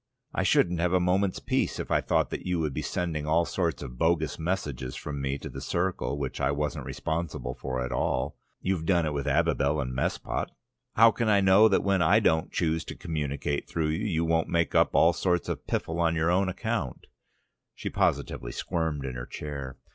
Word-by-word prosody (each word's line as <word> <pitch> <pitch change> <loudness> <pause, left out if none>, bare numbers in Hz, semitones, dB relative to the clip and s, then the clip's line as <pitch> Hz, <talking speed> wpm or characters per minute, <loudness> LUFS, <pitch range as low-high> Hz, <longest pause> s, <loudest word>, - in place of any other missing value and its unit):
"I - - 0
shouldn't 85 -1 +3
have 90 +1 +1
a 90 - +5
moment's 90 +2 +1
peace - - -1
if - - -5
I - - +3
thought - - +1
that - - -4
you 90 -2 -1
would 75 -3 -1
be - - -2
sending 80 -4 -2
all 85 +2 +3
sorts 85 -5 -1
of 60 -3 -9
bogus 80 -1 +1
messages 75 -7 -3
from 70 -1 -5
me 70 0 -1
to - - -8
the - - -7
circle, 85 -4 -1
which 70 -2 -4
I 65 - +2
wasn't 75 0 -2
responsible 80 -6 -3
for 65 -1 -3
at 65 - -5
all. 65 +1 -1 0.3
You've 90 -4 -1
done 85 -3 +3
it 75 - -1
with 70 0 -3
Abibel 70 +1 +2
and 65 -3 -2
Mespot. 65 - -2 0.5
How 115 +1 +7
can 115 0 -1
I 100 -1 +5
know 95 +3 +6
that - - +2
when 100 -2 +2
I 95 +6 +5
don't 80 -7 +2
choose 80 0 0
to - - -7
communicate 75 -2 -3
through 80 -2 0
you, 80 +7 -1
you 85 -4 0
won't 80 0 +1
make 85 -1 +1
up - - +3
all - - +6
sorts 90 -2 0
of - - -4
piffle 80 +1 -2
on 85 -1 +2
your 80 +1 +2
own 95 +1 +2
account?" 90 - -3 0.7
She - - -5
positively - - 0
squirmed 80 -5 -2
in 65 - -4
her 60 0 -6
chair. 70 -3 -6
80 Hz, 210 wpm, -28 LUFS, 70-90 Hz, 0.7 s, How